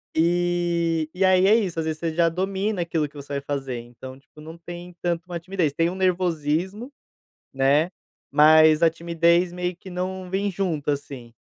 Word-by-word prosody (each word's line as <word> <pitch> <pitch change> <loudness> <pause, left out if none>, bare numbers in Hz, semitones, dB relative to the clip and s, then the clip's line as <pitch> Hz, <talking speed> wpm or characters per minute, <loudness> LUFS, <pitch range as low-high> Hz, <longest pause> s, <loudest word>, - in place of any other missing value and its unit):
Eh, 170 -1 +1
e 185 +1 -1
aí, 185 0 +5
é 215 - +6
isso. 190 -7 -1
Às 160 - -2
vezes, 155 -1 -3
você 165 -1 -2
já 170 +1 +3
domina 190 +3 -2
aquilo 165 -3 -1
que 145 - -24
você 140 0 -8
vai 140 - -2
fazer, 135 -3 -4
então, 125 +2 -11
tipo, 150 +2 -18
não 160 +2 -10
tem 175 +1 -10
tanto 175 0 -2
uma 175 -1 -5
timidez. 175 -3 -1
Tem 165 +3 +1
um 180 - -6
nervosismo, 185 - -1 0.6
né. 140 +5 +2 0.4
Mas 155 +1 +6
a 165 - +6
timidez 170 +1 +1
meio 180 0 -3
que 190 - -13
não 185 +1 -4
vem 195 +2 -1
junto, 175 -6 -2
assim, 140 -4 -6
170 Hz, 185 wpm, -24 LUFS, 155-180 Hz, 0.6 s, é